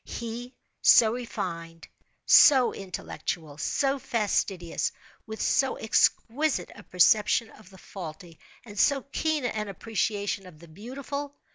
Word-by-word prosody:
He, 235 +2 -7 0.3
so 220 -1 +6
refined, 165 -9 -6 0.4
so 260 -4 +7
intellectual, 165 -5 -6
so 275 - 0
fastidious, 200 -7 -1 0.4
with 220 0 -7
so 270 -1 +1
exquisite 235 - +1
a - - -13
perception 210 +5 +3
of 215 -4 -17
the 190 - -16
faulty, 170 -3 -10 0.3
and 205 -3 -8
so 275 -2 +3
keen 310 -4 -1
an 215 -3 -2
appreciation 205 -1 -3
of 170 -4 -14
the 170 +2 -15
beautiful! 275 - -7
215 Hz, 120 wpm, -27 LUFS, 180-250 Hz, 0.4 s, so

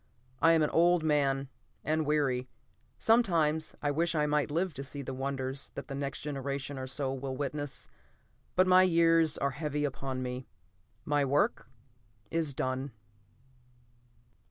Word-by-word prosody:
I 165 +2 +6
am 160 -1 +4
an 150 - 0
old 175 0 +4
man, 140 -3 +1 0.4
and 155 0 0
weary. 135 -4 +1 0.5
Sometimes 165 -9 +2
I 145 - +2
wish 165 +3 0
I 150 -1 +2
might 150 0 +1
live 170 +3 0
to 135 - -6
see 140 +1 -6
the 135 - -5
wonders 135 0 -3
that - - -7
the - - -4
next 140 0 -4
generation 140 -1 -4
or 130 - -5
so 135 0 -2
will 135 0 -4
witness, 145 0 -3 0.7
but 185 - +5
my 185 0 +6
years 165 -3 +4
are 140 - 0
heavy 150 +1 -2
upon 130 -1 -3
me. 125 0 -5 0.6
My 145 -1 +2
work 140 +2 +1 0.6
is 160 -5 0
done. 130 0 -2
145 Hz, 150 wpm, -31 LUFS, 135-160 Hz, 0.7 s, I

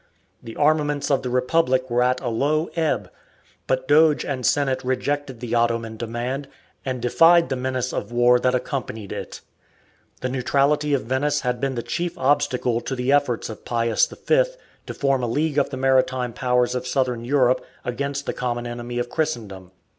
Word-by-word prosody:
The 115 - -9
armaments 150 -1 +1
of 135 - +2
the 125 - -4
Republic 130 +1 +1
were 120 +1 +2
at 125 +1 +2
a 125 - -4
low 150 +8 0
ebb, 160 -2 -1 0.6
but 130 0 0
Doge 150 +1 +4
and 130 -3 -3
Senate 135 0 +1
rejected 135 0 -2
the 120 -1 -5
Ottoman 115 -1 0
demand, 120 +5 -4 0.4
and 130 -2 -4
defied 165 +6 +5
the 135 - 0
menace 130 0 -2
of - - -4
war 120 +1 +4
that 125 0 +1
accompanied 125 -5 -4
it. - - -6 0.8
The 130 - -1
neutrality 140 +3 +1
of 135 - -2
Venice 140 +5 0
had 125 -1 -1
been 135 -1 -1
the 120 - -3
chief 175 +1 -3
obstacle 125 -5 +1
to 135 - -4
the 125 +1 0
efforts 140 -5 +1
of 110 - -9
Pius 115 -2 +1
V - - +2 0.4
to - - -5
form 135 -2 +1
a 120 - -1
league 150 +4 0
of - - +1
the 135 - -5
maritime 130 -2 +1
powers 125 0 +1
of 125 0 -3
Southern 125 -3 0
Europe 130 0 +2 0.2
against 140 +3 -3
the - - -2
common 120 -1 -3
enemy 120 0 -5
of 120 - -1
Christendom. 115 - -3
130 Hz, 175 wpm, -23 LUFS, 120-145 Hz, 0.8 s, defied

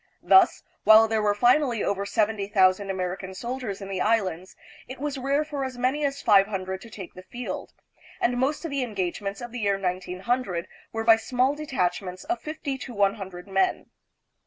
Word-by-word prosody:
Thus, 380 -2 +5 0.2
while 220 +1 +8
there 220 -1 0
were 205 -1 +2
finally 245 +1 +3
over 200 0 -1
seventy! 210 -1 0
thousand 195 0 +3
American 190 0 -4
soldiers 235 -2 -5
in 195 - -6
the 195 -1 -3
Islands, 190 -5 0 0.3
it 260 +1 -8
was 290 -1 -3
rare 280 +3 +1
for 290 -2 -4
as 260 -2 -5
many 260 +4 0
as 280 -1 -2
five 200 -2 +6
hundred 190 -2 -4
to 230 - -11
take 195 -5 -9
the 185 - -10
field, 240 +7 -6 0.5
and 245 - +1
most 275 +6 0
of 325 - -4
the 280 -1 -1
engagements 200 -2 -3
of 240 -1 -7
the 245 - -5
year 200 -2 +1
1900 185 +1 -2 0.2
were 225 0 -3
by 225 0 +7
small 250 +4 +1
detachments 190 -10 -2
of 355 - -2
fifty 300 -3 -4
to 250 -2 -8
one 200 -1 +3
hundred 190 -3 -9
men. 195 -1 0
220 Hz, 185 wpm, -26 LUFS, 195-255 Hz, 0.5 s, while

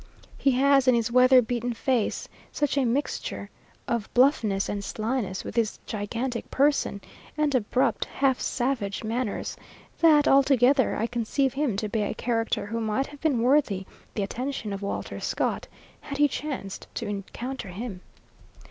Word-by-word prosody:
He 275 - +2
has 275 +1 +4
in 255 - +6
his 235 0 0
weather 255 +1 +6
beaten 240 +1 -2
face 245 -2 0 0.2
such 290 -2 0
a 275 -2 +2
mixture 255 +5 -2 0.4
of 235 -3 -2
bluffness 235 -7 +3
and 200 -1 -3
slyness, 215 -3 -2
with - - -7
his 230 -3 +1
gigantic 230 +4 -3
person, 280 -7 +1 0.4
and 300 -1 +1
abrupt, 255 +1 +1
half 265 -2 +1
savage 240 -6 -1
manners, 225 0 -2 0.4
that, 305 -3 +6
altogether, 270 -1 +4
I 225 - 0
conceive 240 +3 0
him 275 -7 0
to 215 - -1
be 215 +1 -1
a 205 - -2
character 225 -3 -1
who 230 +2 -3
might 220 +4 0
have 290 0 -13
been 275 -8 +1
worthy 245 -8 +2 0.3
the 205 - 0
attention 240 0 -4
of 195 - -5
Walter 200 - -4
Scott, - - -1 0.3
had 280 - -6
he 295 0 +5
chanced 275 -9 -5
to 235 - -3
encounter 210 +5 -5
him. 190 0 -6
245 Hz, 155 wpm, -26 LUFS, 215-270 Hz, 0.4 s, in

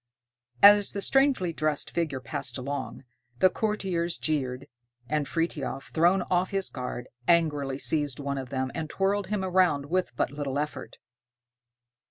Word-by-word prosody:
As 205 0 +8
the 200 - -3
strangely 270 -9 +2
dressed 155 -1 -1
figure 155 -6 -1
passed 120 0 -4
along, 135 +1 -5 0.3
the 185 +5 +5
courtiers 185 -6 -1
jeered, 135 -4 -2 0.4
and 150 0 -1
Frithiof, 155 -5 -3
thrown 175 +4 +3
off 180 +1 0
his 195 -1 -2
guard, 125 -1 -5 0.2
angrily 150 -5 +2
seized 145 -2 0
one 140 -1 -2
of 130 -2 -7
them, 130 -1 -2
and 160 -1 -4
twirled 195 +2 0
him 205 -1 -1
round 175 -6 +2
with 185 0 +1
but 120 - 0
little 140 -2 -3
effort. 150 +1 -4
155 Hz, 145 wpm, -27 LUFS, 140-185 Hz, 0.4 s, As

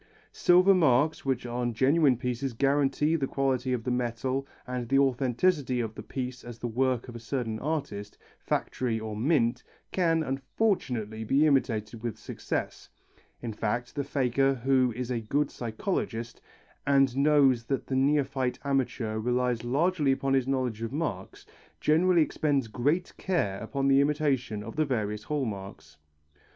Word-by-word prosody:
Silver 180 +2 +5
marks, 155 -4 +3
which 130 -2 -1
on 120 -1 -2
genuine 135 +2 +4
pieces 125 +1 -3
guarantee 140 +4 +2
the 140 -4 0
quality 135 -2 0
of 125 -3 -1
the 125 - -1
metal 125 +2 -1 0.2
and 125 -2 -4
the 135 - +3
authenticity 135 +1 +2
of 110 -2 -2
the - - -8
piece 125 -1 -5
as 120 -1 -9
the 120 - -4
work 125 +1 0
of 120 - -9
a - - -6
certain 115 -2 -3
artist, 120 -9 -4 0.2
factory 120 -3 -1
or 110 -1 -5
mint, 120 -1 +1 0.3
can, 165 -3 +2
unfortunately, 130 - -1
be 135 +7 +3
imitated 115 -6 0
with 115 -2 -4
success. - - -5 0.5
In 115 -2 -3
fact 120 +4 -2
the 145 - -2
faker 135 0 +1
who 130 0 +2
is 125 0 -4
a 120 -2 -1
good 140 +6 0
psychologist 115 - -3 0.5
and 135 -3 +4
knows 140 -4 +4
that 135 +2 -2
the 135 - -3
neophyte 135 -2 +1
amateur 125 -5 -1
relies 125 0 0
largely 150 +4 +1
upon 135 0 0
his 135 -1 +2
knowledge 130 -5 -1
of 115 0 -3
marks, 140 - -4 0.3
generally 170 +2 +4
expends 145 -5 0
great 145 - 0
care 100 - -1
upon 135 +4 -2
the 135 0 +5
imitation 140 -7 0
of 115 +7 -9
the 155 - +3
various 105 -6 -2
hall 150 -3 -1
marks. 95 -8 -8
130 Hz, 155 wpm, -28 LUFS, 120-140 Hz, 0.5 s, Silver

